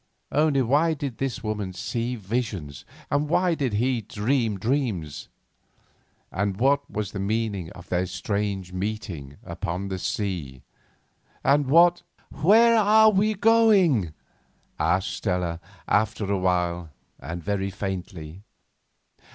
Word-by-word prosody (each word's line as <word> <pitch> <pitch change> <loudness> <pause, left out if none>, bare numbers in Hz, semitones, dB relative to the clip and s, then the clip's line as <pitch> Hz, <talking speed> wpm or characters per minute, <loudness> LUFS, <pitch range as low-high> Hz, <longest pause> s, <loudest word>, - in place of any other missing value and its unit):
Only 145 -3 +3
why 150 +7 +2
did 140 -5 -5
this 135 -3 -3
woman 105 -3 -3
see 120 +6 -3
visions, 100 - -4 0.3
and 145 +1 +1
why 180 +1 +2
did 135 -8 -1
he 120 +3 +1
dream 110 +1 -1
dreams? 105 - -2 1.0
And 100 0 -1
what 140 +3 +2
was 105 -2 -4
the 100 - -5
meaning 100 -3 -2
of 90 - -13
their 90 +1 0
strange 100 -2 -3
meeting 90 -8 -5
upon 90 +4 -4
the 95 -1 -3
sea? 85 - -3 0.8
And 145 0 +3
what—— 170 +4 +5 0.3
"Where 225 +9 +5
are 215 +1 +6
we 210 +2 +2
going?" 195 - +4 0.6
asked 85 +4 +1
Stella 90 -4 -1 0.3
after 110 0 +1
a 100 - 0
while 90 -2 0 0.3
and 85 0 -6
very 100 0 -1
faintly. 95 -3 -6
105 Hz, 120 wpm, -25 LUFS, 90-140 Hz, 1.0 s, are